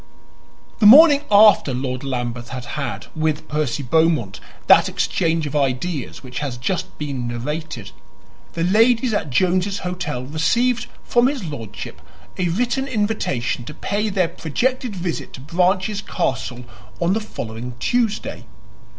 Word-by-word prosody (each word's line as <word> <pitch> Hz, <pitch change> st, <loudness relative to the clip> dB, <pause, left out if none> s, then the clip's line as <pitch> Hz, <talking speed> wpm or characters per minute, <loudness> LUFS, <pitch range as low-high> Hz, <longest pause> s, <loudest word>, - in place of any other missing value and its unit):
The 210 Hz, -, +6 dB
morning 290 Hz, +4 st, +9 dB
after 205 Hz, -, +6 dB
Lord 130 Hz, 0 st, -3 dB
Lambeth 120 Hz, -3 st, -4 dB
had 125 Hz, -1 st, -6 dB
had, 140 Hz, -5 st, -4 dB
with 155 Hz, -1 st, -1 dB
Percy 150 Hz, -2 st, -1 dB
Beaumont, 155 Hz, -, +1 dB, 0.3 s
that -, -, +6 dB
exchange 165 Hz, -1 st, 0 dB
of 145 Hz, -, -5 dB
ideas 140 Hz, +2 st, -2 dB
which 125 Hz, -1 st, -6 dB
has 140 Hz, -4 st, -4 dB
just 185 Hz, +9 st, -3 dB
been 135 Hz, -5 st, -4 dB
narrated, 120 Hz, -1 st, -5 dB, 0.6 s
the 165 Hz, -, -2 dB
ladies 225 Hz, +5 st, +3 dB
at 205 Hz, -, -1 dB
Jones's 185 Hz, +7 st, +1 dB
Hotel 175 Hz, -8 st, -3 dB
received 235 Hz, -, +1 dB, 0.2 s
from 240 Hz, +1 st, +3 dB
his 270 Hz, -5 st, -2 dB
lordship 115 Hz, -, -7 dB, 0.4 s
a 180 Hz, -, +1 dB
written 245 Hz, +8 st, 0 dB
invitation 205 Hz, -, -1 dB
to 150 Hz, -, -8 dB
pay 210 Hz, +2 st, -1 dB
their 190 Hz, -3 st, +1 dB
projected 245 Hz, -, -2 dB
visit 175 Hz, -2 st, -4 dB
to -, -, -9 dB
Branches 185 Hz, +7 st, 0 dB
Castle 125 Hz, -7 st, -3 dB, 0.4 s
on 175 Hz, +2 st, +2 dB
the 220 Hz, -, 0 dB
following 120 Hz, -, -6 dB
Tuesday. 230 Hz, -, -1 dB
165 Hz, 135 wpm, -21 LUFS, 130-210 Hz, 0.6 s, morning